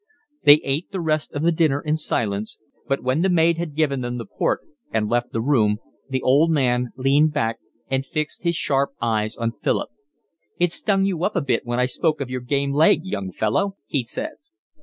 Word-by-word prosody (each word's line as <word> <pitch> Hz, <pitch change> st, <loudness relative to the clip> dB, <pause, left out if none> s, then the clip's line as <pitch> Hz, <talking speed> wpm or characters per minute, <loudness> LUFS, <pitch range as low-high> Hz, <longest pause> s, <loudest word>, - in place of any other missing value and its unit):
They 145 Hz, +1 st, +9 dB
ate 140 Hz, +6 st, -1 dB
the 195 Hz, -, -3 dB
rest 155 Hz, -2 st, -1 dB
of 145 Hz, -, -2 dB
the 170 Hz, -, +4 dB
dinner 155 Hz, -4 st, +2 dB
in 150 Hz, +1 st, 0 dB
silence; 110 Hz, -9 st, -2 dB, 0.3 s
but 135 Hz, 0 st, -1 dB
when 130 Hz, +5 st, +1 dB
the 190 Hz, -, +2 dB
maid 165 Hz, -1 st, +3 dB
had 165 Hz, -4 st, -4 dB
given 140 Hz, -4 st, +1 dB
them 120 Hz, 0 st, -3 dB
the 115 Hz, -, -5 dB
port -, -, -1 dB, 0.3 s
and 110 Hz, -1 st, 0 dB
left 120 Hz, +2 st, 0 dB
the 115 Hz, -, -1 dB
room, 110 Hz, -6 st, +2 dB, 0.3 s
the 130 Hz, -1 st, -2 dB
old 145 Hz, +6 st, +4 dB
man 125 Hz, -5 st, +1 dB
leaned 145 Hz, +4 st, +3 dB
back 115 Hz, -6 st, -1 dB, 0.3 s
and 135 Hz, 0 st, 0 dB
fixed 155 Hz, +3 st, -4 dB
his 170 Hz, -1 st, 0 dB
sharp 140 Hz, -3 st, +1 dB
eyes 110 Hz, -2 st, 0 dB
on 115 Hz, -1 st, -1 dB
Philip. -, -, -2 dB, 0.7 s
"It 175 Hz, -1 st, +2 dB
stung 195 Hz, +1 st, +1 dB
you 180 Hz, -4 st, -1 dB
up 205 Hz, -, 0 dB
a -, -, +2 dB
bit 125 Hz, -4 st, -1 dB
when 120 Hz, +1 st, -1 dB
I 125 Hz, -, +4 dB
spoke 155 Hz, +4 st, 0 dB
of 130 Hz, -3 st, -4 dB
your 130 Hz, 0 st, -3 dB
game 140 Hz, +2 st, 0 dB
leg, 155 Hz, +1 st, +4 dB
young 100 Hz, -, -4 dB
fellow?" 190 Hz, -, 0 dB
he 140 Hz, -, 0 dB
said. 280 Hz, -, -6 dB
140 Hz, 205 wpm, -22 LUFS, 120-160 Hz, 0.7 s, They